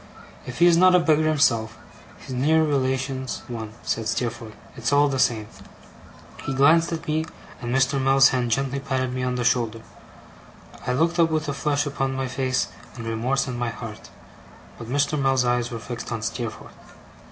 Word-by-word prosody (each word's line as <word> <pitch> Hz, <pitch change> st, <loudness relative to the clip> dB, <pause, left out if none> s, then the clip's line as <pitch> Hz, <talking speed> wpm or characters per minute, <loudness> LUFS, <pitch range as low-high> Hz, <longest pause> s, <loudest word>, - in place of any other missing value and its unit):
'If 125 Hz, -, -6 dB
he 175 Hz, -, +5 dB
is 170 Hz, -1 st, +6 dB
not 185 Hz, +1 st, +6 dB
a -, -, +6 dB
beggar 155 Hz, -2 st, +2 dB
himself, 115 Hz, -7 st, +2 dB, 0.4 s
his 130 Hz, -, -9 dB
near 155 Hz, +5 st, +3 dB
relation's 130 Hz, -2 st, -1 dB
one,' 110 Hz, -3 st, -6 dB
said 115 Hz, -1 st, -2 dB
Steerforth. 115 Hz, -1 st, -3 dB, 0.2 s
'It's 120 Hz, -1 st, -2 dB
all 145 Hz, +1 st, +5 dB
the 135 Hz, -2 st, -2 dB
same.' 110 Hz, -4 st, +2 dB, 1.0 s
He 135 Hz, -, -3 dB
glanced 160 Hz, +5 st, +4 dB
at 165 Hz, -1 st, -5 dB
me, 155 Hz, +1 st, 0 dB, 0.4 s
and 120 Hz, -1 st, -4 dB
Mr. 135 Hz, +1 st, +2 dB
Mell's 135 Hz, 0 st, +5 dB
hand 125 Hz, -2 st, -1 dB
gently 135 Hz, +3 st, 0 dB
patted 130 Hz, -2 st, -2 dB
me 130 Hz, -, -3 dB
upon 125 Hz, 0 st, -1 dB
the 125 Hz, -, -1 dB
shoulder. 115 Hz, -2 st, 0 dB, 1.1 s
I 125 Hz, -, +1 dB
looked 165 Hz, +6 st, +1 dB
up 165 Hz, -1 st, +5 dB
with 155 Hz, -1 st, -1 dB
a 145 Hz, -, -1 dB
flush 145 Hz, +1 st, 0 dB
upon 135 Hz, -2 st, -2 dB
my 135 Hz, 0 st, -2 dB
face 130 Hz, 0 st, -1 dB, 0.3 s
and 115 Hz, -2 st, -7 dB
remorse 120 Hz, +5 st, -1 dB
in 125 Hz, -2 st, -4 dB
my 120 Hz, -1 st, -1 dB
heart, 110 Hz, -1 st, -9 dB, 0.7 s
but 115 Hz, -, -8 dB
Mr. 145 Hz, +2 st, +1 dB
Mell's 135 Hz, -2 st, +2 dB
eyes 120 Hz, 0 st, +1 dB
were 115 Hz, -, -5 dB
fixed 120 Hz, +1 st, -7 dB
on 115 Hz, -1 st, -3 dB
Steerforth. 115 Hz, -1 st, -5 dB
130 Hz, 185 wpm, -24 LUFS, 120-145 Hz, 1.1 s, is